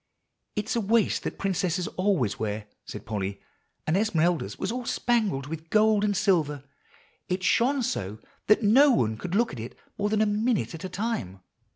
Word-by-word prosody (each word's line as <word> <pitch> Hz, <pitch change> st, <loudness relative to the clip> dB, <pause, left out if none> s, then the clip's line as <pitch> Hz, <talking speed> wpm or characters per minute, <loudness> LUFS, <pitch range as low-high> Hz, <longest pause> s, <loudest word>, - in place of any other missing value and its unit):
"It's 210 Hz, +2 st, -2 dB
a 235 Hz, -, +1 dB
waist 220 Hz, +1 st, +2 dB
that -, -, -5 dB
princesses 185 Hz, -2 st, -1 dB
always 185 Hz, -, 0 dB
wear," 105 Hz, -1 st, -3 dB, 0.2 s
said -, -, -8 dB
Polly; 100 Hz, -2 st, -3 dB, 0.5 s
"and 155 Hz, -, +1 dB
Esmeralda's 175 Hz, -5 st, +1 dB
was -, -, -2 dB
all 250 Hz, +1 st, -3 dB
spangled 215 Hz, -, 0 dB
with 160 Hz, +2 st, -7 dB
gold 215 Hz, 0 st, +4 dB
and 205 Hz, -2 st, +1 dB
silver. 160 Hz, -8 st, +1 dB, 0.7 s
It 185 Hz, 0 st, -1 dB
shone 255 Hz, +8 st, +2 dB
so 100 Hz, -, -3 dB, 0.3 s
that 215 Hz, +2 st, +4 dB
no 260 Hz, +8 st, +6 dB
one 110 Hz, -, +2 dB
could 180 Hz, -, -4 dB
look 230 Hz, -4 st, +2 dB
at 125 Hz, -, -7 dB
it 115 Hz, +2 st, -8 dB, 0.2 s
more 205 Hz, +1 st, +1 dB
than 215 Hz, 0 st, +2 dB
a -, -, +2 dB
minute 215 Hz, 0 st, 0 dB
at 165 Hz, -, -8 dB
a 185 Hz, -, -4 dB
time. 185 Hz, -, -3 dB
190 Hz, 180 wpm, -27 LUFS, 150-220 Hz, 0.7 s, no